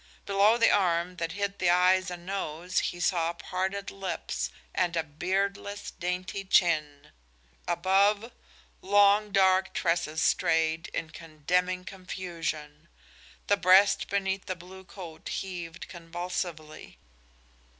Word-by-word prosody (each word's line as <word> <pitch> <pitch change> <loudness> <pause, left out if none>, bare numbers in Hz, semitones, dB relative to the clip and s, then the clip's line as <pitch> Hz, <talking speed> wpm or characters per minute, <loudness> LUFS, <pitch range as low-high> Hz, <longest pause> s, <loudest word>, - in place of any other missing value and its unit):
Below 200 +3 +4
the 230 - +5
arm 180 -2 +1
that 165 -1 -3
hid 200 0 -3
the 180 - +2
eyes 185 +1 +4
and 175 -1 -8
nose 180 -2 -2
he 175 - -3
saw 170 -2 +1
parted 190 +3 -3
lips 190 -4 -4 0.2
and 175 -2 0
a 165 - +1
beardless, 195 +6 -3
dainty 180 +1 -4
chin; 155 -6 +1 0.6
above, 200 +6 +2 0.5
long, 205 +1 +4
dark 190 -1 +3
tresses 170 -2 0
strayed 160 +1 +1
in 160 -2 -5
condemning 180 +4 -2
confusion. 170 -5 -6 0.6
The 205 - +3
breast 195 +1 +5
beneath 195 -1 -1
the 185 - -2
blue 185 +2 -13
coat 175 -5 -9
heaved 175 -3 -5
convulsively. 170 -2 -6
180 Hz, 115 wpm, -28 LUFS, 165-195 Hz, 0.6 s, the